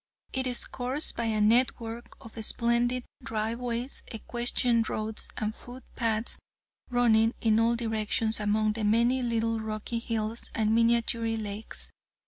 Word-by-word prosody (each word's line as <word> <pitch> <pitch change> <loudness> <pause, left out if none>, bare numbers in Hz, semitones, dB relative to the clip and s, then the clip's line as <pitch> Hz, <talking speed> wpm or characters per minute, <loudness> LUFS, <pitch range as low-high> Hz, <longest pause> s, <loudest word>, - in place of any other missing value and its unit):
It 260 0 0
is 245 -1 +1
coursed 260 +4 0
by 235 - -1
a 220 -1 0
net 230 +4 +4
work 230 +1 -7
of 225 - -11
splendid 240 +2 +2 0.2
drive 225 0 -2
ways, 245 +1 -3
equestrian 235 +1 +1
roads 215 0 -3
and 215 0 -1
foot 245 +3 -11
paths 225 -1 +1 0.5
running 230 -2 +3
in 220 -1 +3
all 230 +1 +3
directions 220 -1 0
among 215 +1 +1
the 220 0 -4
many 235 +5 +3
little 230 -1 0
rocky 220 +1 -3
hills 225 -1 -1
and 220 -1 +2
miniature 230 0 +2
lakes. 210 0 -6
230 Hz, 140 wpm, -28 LUFS, 220-240 Hz, 0.5 s, net